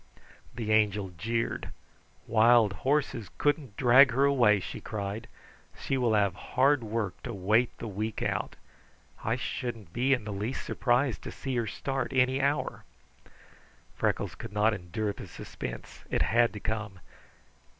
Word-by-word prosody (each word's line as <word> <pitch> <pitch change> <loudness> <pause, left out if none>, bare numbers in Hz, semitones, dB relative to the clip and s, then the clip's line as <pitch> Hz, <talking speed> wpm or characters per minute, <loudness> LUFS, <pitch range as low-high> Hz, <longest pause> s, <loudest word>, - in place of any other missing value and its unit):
The 115 -3 -3
Angel 105 -2 +2
jeered. 115 +7 -2 0.6
"Wild 115 -2 +5
horses 135 -6 0
couldn't 145 -7 0
drag 135 +2 +7
her 135 +3 +3
away," 120 -8 +4
she 90 - -7
cried. 105 +1 -5 0.5
"She 135 - -1
will 120 -4 +2
have 100 -3 +3
hard 130 +7 +2
work 105 -4 -3
to 120 -3 -5
wait 105 +6 +2
the 115 - -6
week 105 +2 -3
out. - - -2 0.7
I 115 - +1
shouldn't 115 -7 -5
be 130 +3 +1
in 125 -4 0
the 105 -1 -5
least 105 +6 -3
surprised 125 0 +1
to - - -7
see 135 -2 -4
her 115 -2 0
start 135 +6 -3
any 130 +1 +3
hour." 140 +2 -1 1.1
Freckles - - -1
could 115 - -9
not 105 +2 +3
endure 100 +3 -3
the 100 - -9
suspense; - - -8
it - - +1
had 115 +1 +3
to 105 - -6
come. 110 -3 -4
115 Hz, 150 wpm, -29 LUFS, 105-130 Hz, 1.1 s, drag